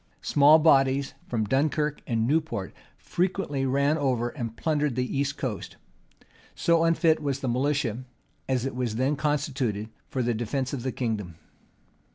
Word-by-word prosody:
Small 145 +2 +6
bodies 140 -3 +3
from 110 -3 -1
Dunkirk 150 +5 0
and 115 -2 +1
Newport 145 -8 -1 0.2
frequently 175 -7 -1
ran 140 +4 +2
over 125 -4 0
and 115 -4 -6
plundered 150 -4 0
the 125 +1 -2
east 140 +1 -1
coast: 115 -7 -4 0.8
so 165 -1 +3
unfit 165 -1 +3
was 140 -2 -2
the 130 - -2
militia, 130 -2 0 0.5
as 130 -1 +1
it 135 - -3
was 125 -3 -2
then 130 +5 +1
constituted, 140 -7 -1 0.2
for 130 - -1
the 120 0 +1
defence 125 +4 -2
of 135 - -3
the 130 +1 -2
kingdom. 105 -9 -3
135 Hz, 150 wpm, -26 LUFS, 120-150 Hz, 0.8 s, Small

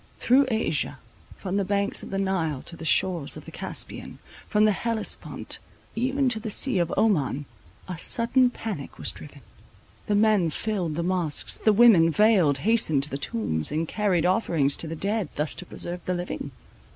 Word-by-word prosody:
Through 265 +3 +3
Asia, 160 - -1 0.4
from 190 0 -3
the 200 - +1
banks 200 +1 0
of - - -9
the 195 - -3
Nile 175 -8 -1
to 170 - -9
the 165 - -9
shores 170 -3 +1
of - - -11
the - - -10
Caspian, - - -4 0.3
from 210 0 +3
the 215 - +4
Hellespont 225 +1 -4 0.4
even 265 +3 0
to 225 -3 -2
the 220 - -5
sea 240 0 +3
of 170 -1 0
Oman, 145 - +1 0.4
a 180 -3 -6
sudden 245 +6 +3
panic 225 -3 -7
was - - 0
driven. - - -12 0.7
The 210 - +1
men 205 -5 +3
filled 180 -3 -3
the 170 - -2
mosques; 175 -4 +1
the 215 - +3
women, 205 -7 +6
veiled, 185 -6 +3
hastened 210 -11 +2
to 145 - -1
the 140 - -4
tombs, 90 - -1
and 160 +2 -1
carried 190 -5 0
offerings 170 -7 +1
to 165 - +2
the 160 - -5
dead, 200 +1 -2
thus 150 +1 -2
to 180 - -9
preserve 175 0 -5
the 180 - -1
living. 175 -5 -5
185 Hz, 180 wpm, -25 LUFS, 160-220 Hz, 0.7 s, women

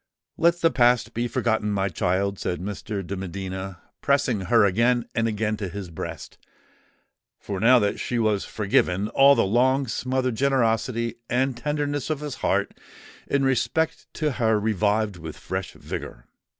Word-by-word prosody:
"Let 170 +1 +2
the 165 - +4
past 120 -2 +3
be 120 +1 -1
forgotten, 110 -2 0
my 100 -1 0
child!" 95 +2 -1
said 90 - -2
Mr. 100 +1 -5
de 100 - -4
Medina, 95 0 -6 0.2
pressing 130 -6 +1
her 115 +2 +4
again 120 +5 +2
and 115 0 +1
again 110 0 -1
to 100 -3 -4
his 95 -1 -7
breast: 80 - -7 1.0
for 100 -2 -5
now 125 +5 +6
that 100 -3 0
she 125 - -2
was 110 -3 +1
forgiven, 100 -1 0
all 140 +1 +6
the - - +2
long 130 +6 +2
smothered 130 +2 -1
generosity 115 -2 0
and 130 +1 +1
tenderness 145 +2 -2
of 155 -2 -2
his 150 -2 -5
heart - - 0 0.5
in 140 0 +1
respect 145 +5 0
to 155 -1 0
her 110 -4 +1
revived 105 -1 0
with 80 -2 -8
fresh 95 -1 -5
vigour. - - -7
110 Hz, 155 wpm, -24 LUFS, 100-130 Hz, 1.0 s, now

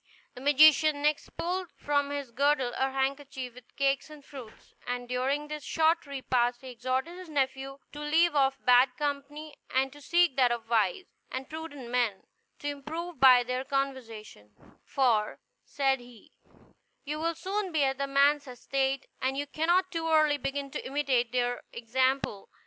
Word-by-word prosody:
The 250 - -11
magician 295 +1 +5
next 300 0 +1
pulled 365 +1 -2
from 285 -1 0
his 285 -3 -4
girdle 270 0 +1
a 265 - +1
handkerchief 270 -1 -3
with 250 -1 -17
cakes 275 +1 0
and 300 -2 -13
fruit, 255 -6 -10 0.4
and 245 0 -3
during 265 +4 -1
this 300 -1 -6
short 320 -1 +1
repast 250 -3 0
he 260 -1 -8
exhorted 260 +8 -3
his 365 -3 -10
nephew 270 -1 -2
to 295 - -9
leave 315 +3 +3
off 270 -2 +2
bad 250 +1 +5
company, 295 +1 -4 0.2
and 265 +1 0
to 290 - -14
seek 340 -2 +2
that 250 -2 +4
of 235 -1 -3
wise 225 - +1 0.3
and 260 0 -5
prudent 290 -6 -7
men, 240 -6 0 0.3
to 290 - -6
improve 310 +3 -6
by 255 -2 +8
their 250 +1 -2
conversation; 230 - -4 0.3
"for," 235 -6 +1 0.3
said 270 -2 +1
he, 245 -2 -16 0.7
"you 300 +2 -4
will 335 +1 -1
soon 390 +2 -3
be 310 -3 +2
at 270 -1 0
man's 285 +1 +3
estate, 270 +2 -2 0.2
and 265 +1 0
you 290 - -1
cannot 345 +5 +1
too 325 -2 -2
early 310 -2 +4
begin 275 +1 -3
to - - -5
imitate 260 -4 0
their 245 -1 0
example." 255 -2 -1
275 Hz, 160 wpm, -29 LUFS, 250-295 Hz, 0.7 s, by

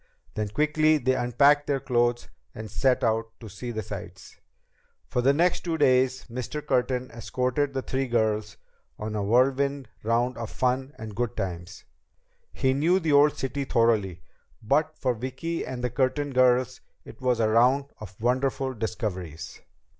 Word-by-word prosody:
Then 105 -1 -2
quickly 155 +7 +2
they 130 -2 +1
unpacked 140 +4 +3
their 140 -1 +1
clothes 120 -1 0 0.3
and 110 -1 -8
set 130 +4 +1
out 115 -1 +1
to 115 - -10
see 105 +5 -7
the 110 -2 -4
sights. - - -9 0.7
For 125 - -1
the 135 +3 +4
next 170 +5 +2
two 165 -2 -3
days, 130 -2 +2
Mr. 125 +5 -5
Curtin 125 -2 0
escorted 125 +4 -2
the 130 - -1
three 135 0 -2
girls 110 -3 0 0.4
on 110 0 -5
a 105 - -1
whirlwind 130 +4 +1
round 115 +2 0
of 115 -2 -5
fun 130 +2 -1
and 110 -1 -8
good 120 -1 -2
times. 85 -2 -5 0.7
He 130 0 +1
knew 165 +7 +2
the 160 -4 0
old 145 +1 +5
city 135 +1 -3
thoroughly, 110 -9 +1 0.4
but 150 +7 +1
for 130 -2 0
Vicki 130 +8 -4
and 125 -1 -6
the 125 - -1
Curtin 140 +3 0
girls 130 0 +3 0.2
it - - -13
was 125 -2 +1
a 110 - +3
round 125 +5 +4
of 95 -3 -11
wonderful 130 +3 0
discoveries. 100 - -5
125 Hz, 160 wpm, -26 LUFS, 115-135 Hz, 0.7 s, old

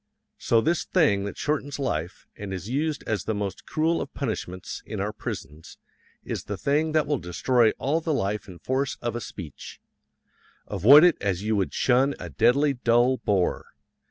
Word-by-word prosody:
So 115 - +3
this 170 +6 +1
thing 100 - +2
that 100 - -6
shortens 145 -1 -2
life, 90 - -3
and 100 -1 -7
is 95 0 -5
used 145 +5 -1
as 105 -5 -2
the 110 - -1
most 100 -1 -5
cruel 165 +1 +1
of 140 - -6
punishments 100 -8 -4
in - - -6
our - - -2
prisons, 75 +3 -7 0.5
is - - -4
the - - -4
thing 155 +3 0
that 155 -1 +3
will 145 -3 0
destroy 110 +8 +2
all 155 +5 0
the 160 - -2
life 105 -7 -1
and 90 -3 -11
force 135 +1 -1
of 120 -1 -3
a 120 - -3
speech. 85 -11 -9 0.9
Avoid 140 - +7
it 175 -2 +5
as 100 -1 -1
you 110 +1 0
would 95 -2 -1
shun 135 +2 +2
a 85 - -7
deadly 140 - +3
dull 120 +1 +2
bore. 95 -6 -1
120 Hz, 180 wpm, -25 LUFS, 100-145 Hz, 0.9 s, Avoid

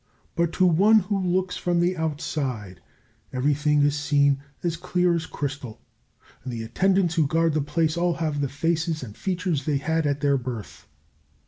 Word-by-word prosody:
But 170 -1 +1
to 185 - +3
one 195 +6 +5
who 195 +1 -1
looks 185 +1 0
from 175 -1 0
the 175 +2 +2
outside 135 - -3 0.5
everything 145 +3 +2
is 145 0 +2
seen 145 -1 +2 0.2
as 170 -2 0
clear 180 +1 +1
as 165 -1 -2
crystal, 140 -5 -5 0.6
and 130 - -5
the 115 -1 -4
attendants 185 +8 +1
who 160 -4 +2
guard 165 +1 +2
the 155 - +1
place 155 +3 0
all 175 0 +1
have 155 -3 -2
the 140 - -1
faces 160 +2 -1
and 105 -4 -9
features 180 -6 -2
they 150 -2 +1
had 160 +2 0
at 140 0 -1
their 140 -1 +3
birth. 120 -4 -7
155 Hz, 175 wpm, -25 LUFS, 140-175 Hz, 0.6 s, one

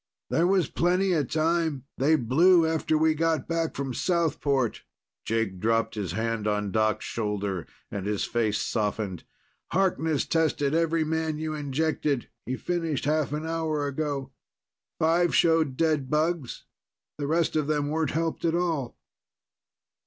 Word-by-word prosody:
"There 170 +2 +3
was 190 -2 +3
plenty 180 +2 +1
of 150 -6 0
time. 160 -3 0
They 145 +5 +3
blew 160 +7 +4
after 160 -1 +1
we 160 0 +3
got 160 0 0
back 165 -1 -1
from 135 -2 -3
Southport." 145 - 0 0.4
Jack 110 -5 -1
dropped 115 +2 +1
his 100 -6 -3
hand 115 0 -1
on 105 -1 0
Doc's 110 0 +1
shoulder, 100 -5 -3 0.2
and 100 -1 -4
his 105 -1 0
face 110 -3 0
softened. 105 -4 -2 0.5
"Harkness 165 -6 +1
tested 155 -3 +1
every 165 0 +2
man 160 0 -1
you 155 0 -3
injected. 145 -2 -1 0.2
He 130 - -1
finished 165 -6 -2
half 150 -1 +1
an 150 +1 -3
hour 160 -2 -1
ago. 140 -1 -3 0.7
Five 170 +2 +2
showed 160 -5 +3
dead 155 -5 +1
bugs. 155 -2 -1 0.6
The 145 - -2
rest 165 +2 +1
of 155 -2 +1
them 145 -1 0
weren't 155 -1 0
helped 165 +2 -2
at 165 -1 +2
all." 165 -8 -1
155 Hz, 145 wpm, -27 LUFS, 125-165 Hz, 0.7 s, blew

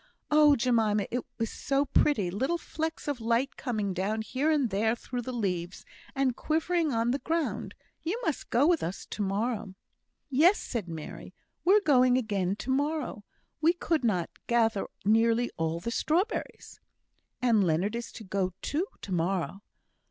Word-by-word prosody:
Oh, 300 -1 +7
Jemima, 225 -5 +2
it 245 0 -1
was 225 -2 -2
so 275 0 0
pretty 235 -9 +2
little 265 - 0
flecks 320 -1 -4
of 285 -5 -2
light 235 +4 +1
coming 215 -6 -2
down 205 +4 -1
here 265 +7 0
and 285 -8 +2
there 220 +4 +2
through 245 +1 -5
the 255 - -5
leaves, 185 -7 -3 0.3
and 270 -3 +1
quivering 325 +1 0
on 230 0 +1
the 275 - 0
ground. 330 +1 -2 0.3
You 370 +8 -2
must 320 - -2
go 260 +5 +3
with 335 0 +3
us 175 +4 -4
to - - -6
morrow." 205 0 -1 0.5
"Yes," 310 +8 +5
said 220 -7 -4
Mary, 160 -2 -8 0.3
"we're 405 +4 +5
going 255 -7 +4
again 200 -6 0
to 260 - -4
morrow. 285 -6 -1 0.4
We 325 +2 +5
could 330 -4 -1
not 185 -7 0 0.2
gather 225 -4 +2 0.2
nearly 230 +3 +3
all 165 +1 -1
the 230 +7 -4
strawberries." 350 - -1 0.6
"And 230 -5 +3
Leonard 180 +6 +1
is 235 0 -5
to 225 - -9
go 190 -2 -1
too, 335 +7 -1 0.2
to 195 - -7
morrow." 185 +2 -1
235 Hz, 160 wpm, -29 LUFS, 200-290 Hz, 0.6 s, Oh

